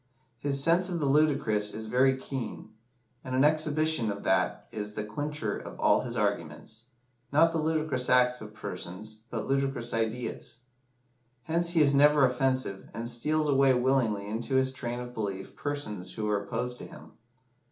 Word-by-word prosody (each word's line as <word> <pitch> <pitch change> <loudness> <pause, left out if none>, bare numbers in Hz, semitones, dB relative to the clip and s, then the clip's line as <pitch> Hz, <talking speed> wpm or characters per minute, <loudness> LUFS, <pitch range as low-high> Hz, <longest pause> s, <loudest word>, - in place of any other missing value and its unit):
His 140 +1 0
sense 175 +3 +3
of 175 -2 -2
the 150 - 0
ludicrous 135 -8 +2
is 110 0 -6
very 130 +3 +3
keen, 130 -5 -6 0.5
and 130 0 -4
an 130 - +4
exhibition 155 -5 +2
of 100 0 -7
that - - +1
is 105 0 -5
the 105 - -2
clincher 110 +1 -3
of - - -9
all - - +4
his 120 -1 -5
arguments 100 +1 -3 0.5
not 165 +3 +5
the 165 - -1
ludicrous 155 -5 0
acts 125 0 +4
of 105 -1 -8
persons, 105 +2 -7
but 115 -2 -4
ludicrous 135 -3 0
ideas. 115 +1 -3 0.8
Hence 170 +1 +1
he 165 - +4
is 140 -1 +5
never 145 0 +6
offensive, 130 -5 -1
and 115 +2 -4
steals 150 +6 +1
away 135 -2 +4
willingly 125 -6 +1
into 115 +5 -2
his 130 0 +2
train 120 -2 -4
of 125 0 -7
belief 100 -4 -5
persons 105 -11 -4
who 110 - -3
were 105 -1 +1
opposed 125 +5 -3
to - - -8
him. - - -13
125 Hz, 165 wpm, -29 LUFS, 110-145 Hz, 0.8 s, never